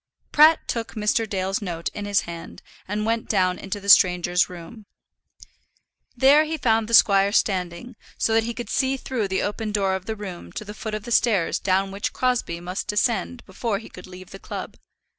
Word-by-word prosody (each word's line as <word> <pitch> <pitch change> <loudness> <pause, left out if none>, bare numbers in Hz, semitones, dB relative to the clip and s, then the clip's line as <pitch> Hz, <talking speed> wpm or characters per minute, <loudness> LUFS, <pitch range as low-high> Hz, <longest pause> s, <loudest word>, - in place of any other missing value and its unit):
Pratt 310 +2 +5
took 230 0 -4
Mr. 215 +1 0
Dale's 195 0 -2
note 170 -4 -4
in 205 - -7
his 205 -1 +2
hand 170 -1 -9 0.2
and 210 +2 -2
went 230 0 -1
down 185 -3 +1
into 195 +1 -5
the 200 - -11
stranger's 180 -2 +5
room. 180 +5 -11 1.3
There 275 +5 +6
he 320 +1 -3
found 225 -5 +1
the 230 - +4
squire 200 -1 +5
standing, 190 +4 -1 0.2
so 225 - +1
that 225 0 +3
he 235 0 -4
could 240 -3 -6
see 265 0 +1
through 250 -5 -3
the 190 0 -1
open 210 +1 -3
door 195 -2 +1
of 190 -1 -4
the 220 - -3
room 195 -4 -8
to 215 - -6
the 205 - -8
foot 215 0 -5
of 215 - -6
the 240 - -8
stairs 215 -8 +2
down 195 0 0
which 200 +1 -3
Crosbie 250 -9 -1
must 180 +2 -5
descend 235 +3 -1
before 200 +2 -3
he 220 - -11
could 180 - -12
leave 185 0 -12
the 195 - -10
club. - - -7
205 Hz, 200 wpm, -23 LUFS, 185-225 Hz, 1.3 s, There